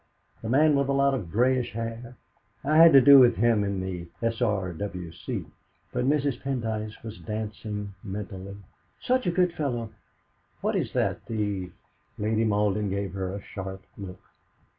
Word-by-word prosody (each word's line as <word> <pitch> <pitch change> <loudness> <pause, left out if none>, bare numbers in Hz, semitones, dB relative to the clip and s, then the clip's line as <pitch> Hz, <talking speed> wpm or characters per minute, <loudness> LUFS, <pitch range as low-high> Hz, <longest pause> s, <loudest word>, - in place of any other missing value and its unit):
The 110 - -5
man 150 +4 +4
with 140 0 +1
a - - +2
lot 140 0 +3
of 100 -11 -3
greyish 125 +3 +2
hair? 115 +1 -6 0.5
I've 155 +3 +2
had 165 -2 +9
to 135 - +9
do 140 +1 +9
with 120 -2 +6
him 115 -2 +3
in 100 -1 -2
the 90 -2 -5 0.2
S.R.W.C." 95 -6 -2 0.5
But - - 0
Mrs. 140 -2 +1
Pendyce 110 -5 -3
was 110 -1 -8
dancing 105 -1 -5
mentally. 100 -1 -6 0.4
"Such 255 -4 0
a - - +3
good 180 0 +2
fellow! 120 -8 -3 0.7
What - - 0
is - - -1
that - - -1
the 105 -5 -2 0.2
?" - - -41
Lady 110 +2 +1
Malden 105 -1 +1
gave 100 -1 -3
her 95 -1 -3
a 100 +1 -6
sharp 95 0 -7
look. 95 -2 -9
110 Hz, 160 wpm, -27 LUFS, 100-130 Hz, 0.7 s, had